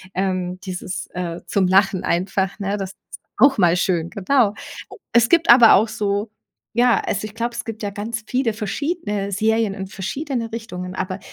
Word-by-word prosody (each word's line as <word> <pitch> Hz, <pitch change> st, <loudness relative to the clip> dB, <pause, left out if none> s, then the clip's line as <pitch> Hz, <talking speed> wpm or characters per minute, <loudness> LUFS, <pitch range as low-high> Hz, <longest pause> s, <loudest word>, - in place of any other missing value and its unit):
Ähm, 185 Hz, -1 st, -2 dB
dieses, 185 Hz, -1 st, -5 dB
äh, 175 Hz, -1 st, -4 dB
zum 195 Hz, -2 st, +1 dB
Lachen 190 Hz, 0 st, +3 dB
einfach, 190 Hz, +2 st, -1 dB
ne? 200 Hz, 0 st, -1 dB
Das 195 Hz, -2 st, -5 dB
ist -, -, -44 dB, 0.4 s
auch 270 Hz, -1 st, +5 dB
mal 175 Hz, -2 st, +4 dB
schön, 175 Hz, -2 st, 0 dB
genau. 210 Hz, +1 st, +2 dB, 0.6 s
Es 235 Hz, 0 st, +4 dB
gibt 335 Hz, -1 st, +3 dB
aber 235 Hz, -2 st, +8 dB
auch 215 Hz, +3 st, +3 dB
so 205 Hz, +1 st, -2 dB, 0.4 s
ja, 240 Hz, 0 st, +4 dB
also, 205 Hz, +2 st, -3 dB
ich 215 Hz, -, -15 dB
glaube, 235 Hz, +1 st, -2 dB
es 235 Hz, -, -4 dB
gibt 225 Hz, -1 st, -7 dB
ja 205 Hz, -, -1 dB
ganz 215 Hz, +2 st, -5 dB
viele 250 Hz, -3 st, 0 dB
verschiedene 210 Hz, -, -3 dB
Serien 220 Hz, +1 st, +1 dB
in 195 Hz, -1 st, -6 dB
verschiedene 230 Hz, -, -4 dB
Richtungen. 180 Hz, -5 st, -6 dB
Aber 185 Hz, +1 st, -3 dB
205 Hz, 175 wpm, -21 LUFS, 185-230 Hz, 0.6 s, aber